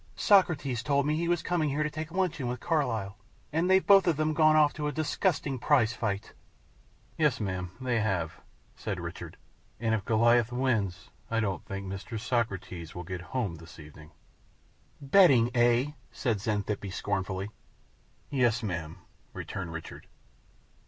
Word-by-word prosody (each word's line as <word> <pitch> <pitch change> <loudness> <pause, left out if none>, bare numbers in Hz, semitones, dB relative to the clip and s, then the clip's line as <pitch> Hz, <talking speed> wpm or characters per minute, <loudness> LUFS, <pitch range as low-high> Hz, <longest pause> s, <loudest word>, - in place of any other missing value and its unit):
Socrates 155 - +3
told 140 +1 +1
me 150 +1 +1
he 170 +2 -1
was 175 -1 +1
coming 170 -4 0
here 145 +2 0
to 150 - -1
take 155 +1 -5
luncheon 175 -8 -1
with 125 0 -3
Carlyle, 115 - -1 0.3
and 165 +4 +1
they've 190 0 +4
both 195 -2 +6
of 160 -3 +2
'em 155 0 +1
gone 155 0 +5
off 150 -1 +5
to 150 -1 -3
a - - -1
disgusting 150 -2 -1
prize 120 -4 +3
fight!" 110 -3 -3 0.9
"Yes, 150 -5 +2
ma'am, 95 -4 -3
they 125 -3 0
have," 95 -7 -2 0.3
said - - -4
Richard; - - -7 0.4
"and 115 0 0
if 110 -3 0
Goliath 115 +2 +3
wins, 110 -8 -1 0.2
I 115 - +1
don't 100 -6 -2
think 100 -1 -5
Mr. 100 +4 -5
Socrates 95 -8 -3
will 90 - -5
get 90 0 -6
home 100 -3 -3
this 80 +2 -13
evening." 75 0 -13 0.9
"Betting, 135 -6 +5
eh?" 120 +3 +3 0.2
said 110 -5 -1
Xanthippe, 105 -1 -2
scornfully. 95 0 -3 0.8
"Yes, 120 -3 +2
ma'am," 85 -3 -4 0.3
returned 90 -4 -5
Richard. 80 0 -8
120 Hz, 150 wpm, -29 LUFS, 100-150 Hz, 0.9 s, both